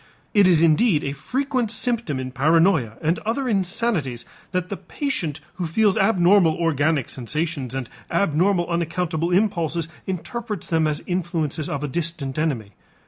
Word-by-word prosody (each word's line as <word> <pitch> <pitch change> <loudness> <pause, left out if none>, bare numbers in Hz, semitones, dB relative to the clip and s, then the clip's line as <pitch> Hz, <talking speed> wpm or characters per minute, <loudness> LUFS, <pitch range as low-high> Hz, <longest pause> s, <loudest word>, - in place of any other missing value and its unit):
It 205 -4 +6
is 170 -3 +4
indeed 165 +1 +4
a 140 - -2
frequent 255 - -1
symptom 230 - -1
in 130 0 -4
paranoia 150 - +3
and 160 +3 +1
other 245 +5 -2
insanities 185 - 0 0.3
that 180 -1 -1
the 200 - -4
patient 170 - -3 0.2
who 175 - -2
feels 205 +4 +3
abnormal 195 -4 +4
organic 155 -4 +1
sensations 140 0 -3
and 130 -3 -3 0.2
abnormal 180 0 +2
unaccountable 170 -1 -1
impulses 170 -4 +1 0.2
interprets 210 +2 -4
them 160 -2 +1
as 150 -1 -2
influences 165 -4 -2
of 140 0 -3
a - - -1
distant 155 -2 -3
enemy. 125 -10 -1
170 Hz, 140 wpm, -23 LUFS, 150-195 Hz, 0.3 s, It